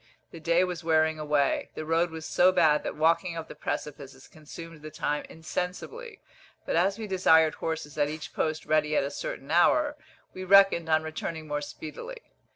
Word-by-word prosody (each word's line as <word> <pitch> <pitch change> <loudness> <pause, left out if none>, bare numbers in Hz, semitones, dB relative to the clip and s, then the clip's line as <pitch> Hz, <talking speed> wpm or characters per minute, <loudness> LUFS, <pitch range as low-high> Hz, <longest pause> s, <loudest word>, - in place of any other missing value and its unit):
The 165 - -10
day 170 +2 +2
was 180 -2 -4
wearing 160 -1 +2
away. 150 -2 0
The 155 - -5
road 165 +2 +1
was 160 -1 -8
so 185 +1 +4
bad 160 -5 +4
that - - -5
walking 165 +2 +1
up 160 - -6
the - - -9
precipices 140 -2 -6
consumed 160 +1 -11
the 155 - -8
time 150 0 -2
insensibly; 185 - -6 0.4
but - - -1
as 190 +4 +2
we 225 - -5
desired 160 -5 +4
horses 160 -2 -5
at 145 0 +2
each 155 0 -7
post 155 0 -2
ready 155 -1 +1
at - - +2
a 140 - -3
certain 140 0 -6
hour, 290 - +3 0.4
we 185 - -7
reckoned 195 -3 +5
on 155 0 +3
returning 160 0 -5
more 145 0 -2
speedily. 310 - -8
160 Hz, 180 wpm, -27 LUFS, 155-175 Hz, 0.4 s, reckoned